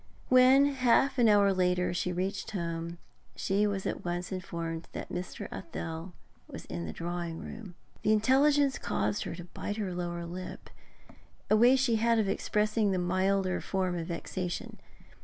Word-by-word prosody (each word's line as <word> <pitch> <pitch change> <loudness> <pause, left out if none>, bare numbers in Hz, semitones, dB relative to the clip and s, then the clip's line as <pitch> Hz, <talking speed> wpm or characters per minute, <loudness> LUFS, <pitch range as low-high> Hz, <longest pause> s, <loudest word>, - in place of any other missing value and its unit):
When, 255 +2 +7
half 270 0 +3
an 235 -2 +6
hour 200 -1 +5
later, 180 -1 +1
she 180 +1 -1
reached 190 +3 -2
home, 170 -3 -4 0.4
she 200 +2 +1
was 195 -2 -2
at - - -3
once 175 +1 -3
informed 170 -3 -4
that - - -6
Mr. 180 0 -5
Athel 165 +1 -6 0.3
was - - -9
in 85 +1 -5
the - - -4
drawing 170 - -4
room. 200 -2 -9 0.3
The 210 - +2
intelligence 275 +5 +4
caused 105 0 -1
her - - -4
to 175 - -8
bite 205 +4 -5
her 195 -4 -2
lower 175 -1 -3
lip, 180 +2 -8 0.8
a - - +7
way 240 +4 +6
she 255 -4 +2
had 230 +1 +3
of 215 -3 +2
expressing 210 +2 +1
the 190 - +1
milder 185 +1 +1
form 185 -2 -1
of 165 -1 -4
vexation. 175 +1 -4
185 Hz, 160 wpm, -30 LUFS, 175-215 Hz, 0.8 s, When